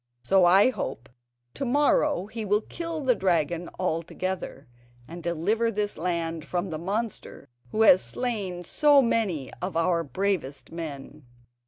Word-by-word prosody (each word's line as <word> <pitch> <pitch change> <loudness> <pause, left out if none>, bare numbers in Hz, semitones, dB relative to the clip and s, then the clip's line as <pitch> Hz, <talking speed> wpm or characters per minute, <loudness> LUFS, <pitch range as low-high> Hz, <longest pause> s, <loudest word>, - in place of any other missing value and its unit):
So 190 +6 +4
I 195 +8 +6
hope 135 - -5 0.4
to - - -4
morrow 285 -2 +2
he 220 +2 -6
will 210 +1 +2
kill 330 +4 -5
the 260 -3 +3
dragon 175 -4 0
altogether, 170 -3 -3 0.4
and 170 +2 -8
deliver 185 +8 0
this 205 -1 -2
land 165 -1 -2
from 175 +2 -3
the 155 - -4
monster 205 +5 -4 0.2
who 220 - +2
has 185 -4 +7
slain 200 -8 -3
so 290 - +4
many 195 - 0
of 180 -2 -3
our 170 0 +2
bravest 145 -5 -2
men." 150 -3 -8
185 Hz, 140 wpm, -26 LUFS, 165-220 Hz, 0.4 s, has